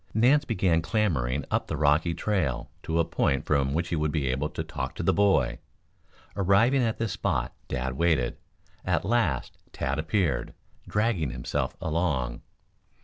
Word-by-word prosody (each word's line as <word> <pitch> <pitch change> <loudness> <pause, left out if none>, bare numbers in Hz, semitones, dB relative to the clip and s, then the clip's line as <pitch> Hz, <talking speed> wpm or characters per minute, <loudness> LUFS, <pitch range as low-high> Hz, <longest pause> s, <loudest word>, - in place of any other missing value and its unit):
Nance 135 +7 +4
began 90 -8 +2
clambering 75 - 0
up - - 0
the 75 - -3
rocky 75 +3 +2
trail 90 - -1
to 80 - -2
a 85 - +3
point 70 -3 0
from 70 -2 +1
which 85 +4 -1
he 85 - 0
would 75 -1 0
be 70 -5 0
able 70 +4 -1
to - - -4
talk - - -5
to - - -4
the - - +3
boy. 70 -12 +2 0.8
Arriving 105 +8 +4
at 115 -2 0
this 115 -3 -1
spot, 95 -2 -1
Dad 65 0 -2
waited. 70 -4 +1 0.5
At - - 0
last 100 - 0
Tad 70 +3 -2
appeared, 85 +3 0 0.3
dragging 105 - 0
himself 60 -1 -3
along. 75 -7 -1
80 Hz, 155 wpm, -27 LUFS, 70-100 Hz, 0.8 s, Nance